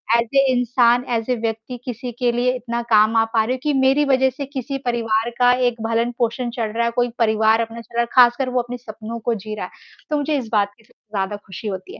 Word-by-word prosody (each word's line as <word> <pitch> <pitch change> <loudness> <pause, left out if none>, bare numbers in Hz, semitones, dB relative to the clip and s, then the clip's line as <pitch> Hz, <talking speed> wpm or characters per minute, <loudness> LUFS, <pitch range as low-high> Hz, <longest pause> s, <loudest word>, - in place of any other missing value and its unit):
As 235 - +3
a 275 - +6
इंसान 245 -1 +3
as 230 0 -1
a - - +2
व्यक्ति 225 +2 -4
किसी 245 0 -5
के 245 -2 +2
लिए 245 +1 +1
इतना 235 -1 -3
काम 215 0 +5
आ 225 - +5
पा 225 -1 +3
रही 235 +3 -1
हूँ, 260 - -4
कि 300 - +1
मेरी 265 +2 +4
वजह 265 -1 +3
से 270 +2 -6
किसी 275 0 -4
परिवार 230 -1 0
का 245 0 +6 0.2
एक 235 -2 -3
भरण-पोषण 235 +1 -1
चल 225 -2 -1
रहा 235 0 +1
है, 235 - 0
कोई 245 0 +1
परिवार 220 0 +3
अपना 230 0 -5
चला 235 0 -11
रहा, - - +1 0.2
ख़ासकर 245 +2 +1
वो 250 0 +1
अपने 245 +1 -7
सपनों 225 0 -8
को 235 +1 -1
जी 215 +1 -6
रहा - - -4
है। - - -12 0.4
तो 300 - +1
मुझे 290 +1 0
इस 250 -4 -4
बात 205 -2 +1
की - - -23
सबसे 215 - -31
ज़्यादा 195 +1 -1
ख़ुशी 195 +3 -8
होती 190 -2 -6
है, - - -13
235 Hz, 250 wpm, -21 LUFS, 225-250 Hz, 0.4 s, a